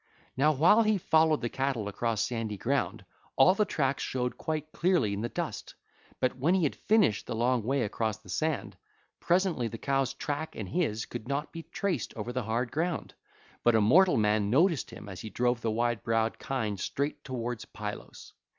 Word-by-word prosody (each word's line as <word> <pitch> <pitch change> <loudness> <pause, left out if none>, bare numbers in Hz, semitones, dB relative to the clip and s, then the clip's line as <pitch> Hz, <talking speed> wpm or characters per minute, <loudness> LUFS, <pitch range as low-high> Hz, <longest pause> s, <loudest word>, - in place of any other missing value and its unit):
Now 145 +4 +4
while 170 +10 +5
he 215 -2 +3
followed 160 -3 +3
the 120 - 0
cattle 130 -5 -1
across 110 +1 -1
sandy 115 -4 -3
ground, - - -1 0.3
all 185 - +6
the 210 +2 +2
tracks 140 -7 0
showed 125 -1 -2
quite 155 -1 -4
clearly 170 - +2
in 100 - -3
the 120 - -2
dust; - - -5 0.4
but 130 0 +1
when 150 +8 +2
he 185 - +2
had 145 - +1
finished 205 - +2
the - - -3
long 120 +1 +2
way 130 +4 0
across 110 0 -2
the 95 - -21
sand, 155 - -2 0.4
presently 175 -8 +1
the 115 - -6
cows' 135 +1 0
track 150 +2 -4
and 100 -4 -5
his 140 -10 0
own - - -29
could 120 -1 -6
not 140 +3 -2
be 165 - -6
traced 180 - -3
over 115 +3 -4
the 130 - -1
hard 115 +2 -1
ground. 165 +3 -2 0.5
But 120 -1 +4
a - - +5
mortal 175 - +5
man 105 -1 +2
noticed 160 - +3
him 105 - -10
as 95 -3 -7
he 110 - -6
drove 120 +1 0
the 115 - 0
wide 120 0 0
browed 115 0 0
kine 110 -7 -2
straight 140 +9 -3
towards 120 -3 -4
Pylos. - - -8
130 Hz, 195 wpm, -29 LUFS, 115-155 Hz, 0.5 s, all